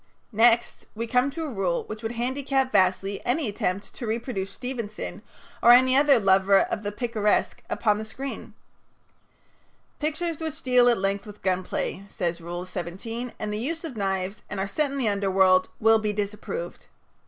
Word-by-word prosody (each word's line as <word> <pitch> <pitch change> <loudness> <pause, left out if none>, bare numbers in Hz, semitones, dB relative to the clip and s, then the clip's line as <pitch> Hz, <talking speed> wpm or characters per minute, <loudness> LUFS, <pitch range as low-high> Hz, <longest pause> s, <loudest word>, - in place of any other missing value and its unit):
Next 230 +2 +3
we 230 +2 -2
come 250 +3 +2
to 325 +3 -5
a 310 - -3
rule 185 -4 0
which 215 0 -8
would 225 +1 -3
handicap 265 +2 0
vastly 195 +1 +2
any 265 +3 0
attempt 200 -1 -3
to 240 - -6
reproduce 220 -3 -3
Stevenson 235 -2 -6 0.4
or - - +5
any 255 +1 +6
other 280 -2 +5
lover 195 0 +4
of - - -2
the 205 -1 -3
picaresque 215 -1 0
upon 210 -2 +1
the - - -4
screen. 265 +5 -7 1.5
"Pictures 315 +1 -2
which 320 0 -5
deal 250 -1 +5
at 235 - +3
length 195 +3 -1
with 210 0 -12
gun 185 -1 +1
play," 190 - -3
says 170 -2 -3
Rule 175 +2 -5
17, 190 +7 -5
"and 210 -1 -3
the 210 - -2
use 320 +8 -3
of 310 -7 -6
knives, 195 0 -2
and 205 - -4
are 190 - -1
set 290 +9 0
in 280 - -4
the 255 -5 0
underworld, 190 -2 +3
will 225 0 +5
be 210 -1 -1
disapproved. 210 - -5
220 Hz, 175 wpm, -26 LUFS, 195-255 Hz, 1.5 s, any